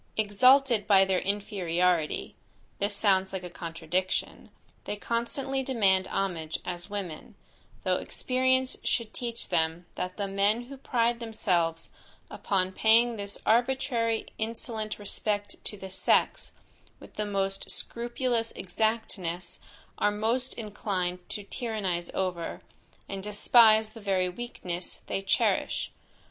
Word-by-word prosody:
Exalted 235 +2 +4
by 195 -2 +7
their 190 -1 +1
inferiority 180 -5 0 0.4
(this 205 +1 +1
sounds 190 -2 +3
like 190 -1 -3
a 180 - -7
contradiction) 170 +2 -3 0.4
they - - -3
constantly 260 +5 -1
demand 200 -8 +2
homage 165 -5 -2
as 175 +1 -3
women, 195 -6 -6 0.5
though - - +2
experience 260 0 +1
should 230 -2 -1
teach 235 -1 -4
them 165 0 0
that 180 0 -4
the 200 -1 -1
men 200 +4 +2
who 270 +3 -9
pride 240 -2 +1
themselves 180 -8 -1 0.4
upon 185 -2 0
paying 230 +4 +4
this 200 -1 -4
arbitrary 235 -1 +2
insolent 220 -1 -3
respect 205 0 -2
to 210 - -4
the 190 -1 -8
sex, 190 - +2 0.5
with - - -14
the 210 - -2
most 195 -1 -1
scrupulous 235 -1 -2
exactness, 185 -4 -2 0.4
are 210 - +4
most 230 +5 0
inclined 195 -5 -2
to 205 - -5
tyrannize 200 -7 -2
over, 180 -3 -2 0.4
and 195 -1 -5
despise 215 +2 +5
the 225 +1 -12
very 190 -2 +1
weakness 180 -4 -4
they 195 - -2
cherish. 195 - +1
205 Hz, 120 wpm, -28 LUFS, 185-230 Hz, 0.5 s, by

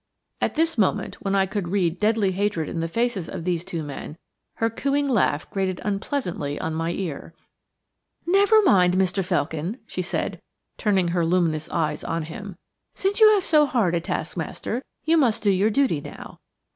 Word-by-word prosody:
At - - 0
this 325 -4 +1
moment, 200 0 0
when 195 0 0
I 195 -1 +3
could 195 -1 -3
read 180 -2 0
deadly 210 -2 +2
hatred 190 -4 -1
in 165 - -4
the 165 - -1
faces 230 -2 -1
of 180 -3 -6
these 175 -1 -1
two 170 -3 -4
men, 145 +2 -7 0.4
her 225 - +1
cooing 280 +5 0
laugh 200 - +1
grated 190 -2 -1
unpleasantly 195 - -2
on 160 - -3
my 165 +1 -1
ear. 170 -5 -5 0.9
"Never 405 +4 +5
mind, 180 - +4
Mr. 190 +1 +1
Felkin," 175 - -2
she 185 - -4
said, 180 - -3 0.4
turning 190 -5 +2
her 170 0 +1
luminous 165 -3 +1
eyes 155 -3 -1
on 165 0 -2
him. 190 +4 -8 0.4
"Since 395 +3 0
you 435 -1 +9
have 390 - 0
so 305 -3 +4
hard 225 -10 +1
a 170 - +2
taskmaster, 240 +7 -4 0.2
you 325 +1 +3
must 240 -8 +2
do 205 - +4
your 195 +3 +3
duty 225 - +1
now. - - -10
190 Hz, 175 wpm, -24 LUFS, 170-230 Hz, 0.9 s, you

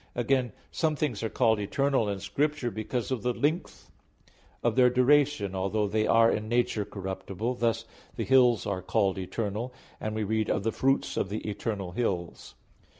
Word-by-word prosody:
Again, 125 0 +1 0.2
some 155 -2 0
things 140 -8 -2
are 110 - -1
called 110 -3 +2
eternal 130 +2 +1
in 100 -1 -3
Scripture 130 +6 -1
because 115 +4 -3
of 130 -4 -1
the 125 +3 0
length 155 +5 -2 0.7
of 120 -2 +1
their 125 -1 +6
duration, 125 -4 +3
although 100 +3 0
they 110 +1 0
are 115 0 +5
in 110 0 -2
nature 120 -3 +1
corruptible; 95 +4 -4
thus 115 -3 0
(Ps. - - -28 0.2
75:5) - - -24
the - - -2
hills 125 -6 +4
are 100 -3 -2
called 95 0 +1
"eternal" 105 +5 -3 0.3
and 110 0 -3
we 110 - -1
read 110 +1 0
"of 100 - 0
the 115 - +1
fruits 135 +3 0
of 95 - 0
the 110 +1 -4
eternal 100 -2 -3
hills." 90 -5 -3
110 Hz, 180 wpm, -28 LUFS, 100-125 Hz, 0.7 s, their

